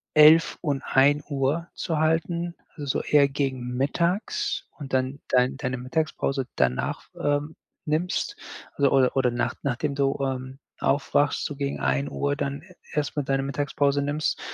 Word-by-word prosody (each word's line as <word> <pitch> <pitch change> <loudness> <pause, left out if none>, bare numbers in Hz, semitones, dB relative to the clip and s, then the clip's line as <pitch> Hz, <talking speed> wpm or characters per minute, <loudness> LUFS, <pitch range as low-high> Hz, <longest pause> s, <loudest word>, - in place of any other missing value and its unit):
11:00 155 +2 +7
und 145 -4 -1
1:00 145 +3 +2
zu 165 -3 -2
halten, 170 +2 0 0.2
also, 145 - -6
so 135 - 0
eher 145 -2 +5
gegen 130 -3 -2
Mittags 180 - 0
und 140 -3 -8
dann 130 +2 0
dein 125 +1 +3
deine 125 -2 -2
Mittagspause 135 0 -1
danach, 65 0 0
ähm, 145 +2 0 0.3
nimmst, 160 +3 -1 0.4
also 140 -1 +3
oder 130 -1 +3
oder 130 -2 +3
nach 120 0 -1
nachdem 140 +2 -1
du, 140 0 +1
ähm, 130 0 -3 0.2
aufwachst, 145 +1 +1
so 145 - -4
gegen 140 - -3
13:00 70 - 0
dann 140 0 -3
e 180 +2 -18 0.2
erstmal 145 0 -1
deine 135 0 +1
Mittagspause 140 +1 0
nimmst. 145 +2 -1
140 Hz, 145 wpm, -25 LUFS, 130-150 Hz, 0.4 s, 11:00